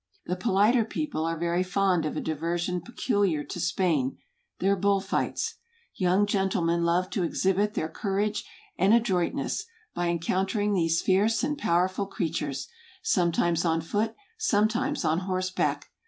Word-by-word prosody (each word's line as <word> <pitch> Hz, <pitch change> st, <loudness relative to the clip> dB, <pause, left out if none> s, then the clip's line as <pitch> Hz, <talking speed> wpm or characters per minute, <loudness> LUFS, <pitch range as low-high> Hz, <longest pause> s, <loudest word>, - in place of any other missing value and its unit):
The 180 Hz, -, -1 dB
politer 210 Hz, +5 st, +3 dB
people 225 Hz, -, -3 dB
are 165 Hz, 0 st, -1 dB
very 170 Hz, +2 st, 0 dB
fond 185 Hz, -3 st, +1 dB
of -, -, -4 dB
a -, -, -1 dB
diversion 170 Hz, +3 st, -2 dB
peculiar 200 Hz, -, 0 dB
to 175 Hz, -, -7 dB
Spain, 170 Hz, -6 st, 0 dB, 0.4 s
their 195 Hz, +2 st, +2 dB
bull 200 Hz, +1 st, +2 dB
fights. 195 Hz, +1 st, -2 dB, 0.4 s
Young 185 Hz, +2 st, +2 dB
gen¬ 195 Hz, -2 st, +1 dB
tlemen 170 Hz, -2 st, +1 dB
love 175 Hz, +2 st, +1 dB
to 200 Hz, -, -1 dB
exhibit 195 Hz, +4 st, +1 dB
their 160 Hz, -, -1 dB
courage 205 Hz, +4 st, -1 dB, 0.4 s
and 195 Hz, +3 st, +5 dB
adroit¬ 190 Hz, -7 st, +2 dB
ness, -, -, -2 dB, 0.3 s
by 175 Hz, -, -1 dB
encountering 190 Hz, +5 st, 0 dB
these 165 Hz, -3 st, +1 dB
fierce 205 Hz, +4 st, +2 dB
and 295 Hz, +1 st, 0 dB
powerful 185 Hz, -, +1 dB
creatures; 150 Hz, -7 st, -3 dB, 0.4 s
sometimes 170 Hz, -, +2 dB
on 165 Hz, -1 st, +2 dB
foot, 210 Hz, +7 st, -1 dB, 0.2 s
sometimes 245 Hz, -, +1 dB
on 160 Hz, +2 st, +2 dB
horseback. 185 Hz, 0 st, -1 dB
185 Hz, 145 wpm, -27 LUFS, 170-205 Hz, 0.4 s, and